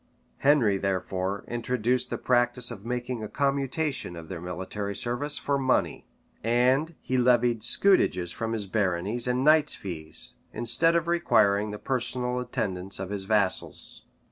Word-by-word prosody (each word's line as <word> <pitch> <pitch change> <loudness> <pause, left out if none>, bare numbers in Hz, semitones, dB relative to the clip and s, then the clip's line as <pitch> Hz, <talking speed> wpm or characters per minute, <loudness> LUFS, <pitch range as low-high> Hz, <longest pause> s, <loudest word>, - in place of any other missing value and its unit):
Henry, 125 -9 +4
therefore, 95 0 -2
introduced 125 +1 0
the - - -2
practice 120 0 +1
of 100 -4 -8
making 125 0 -3
a - - -3
commutation 140 - -1
of 80 -1 -9
their 85 -3 -6
military 95 +3 -4
service 140 +7 -2
for 140 -1 0
money; 130 -1 0 0.4
and 130 +8 +2
he 130 0 0
levied 120 -2 +3
scutages 90 - +3
from 115 -1 -3
his 110 -3 -2
baronies 100 +3 -1
and 125 +1 +1
knights' 155 0 +4
fees, 80 -5 -7 0.2
instead 130 +9 +3
of 170 -1 +1
requiring 105 -12 +3
the 105 - -5
personal 125 0 -2
attendance 100 -6 -3
of 95 0 -5
his 100 -2 -4
vassals. 100 -3 -1
120 Hz, 140 wpm, -27 LUFS, 100-130 Hz, 0.4 s, Henry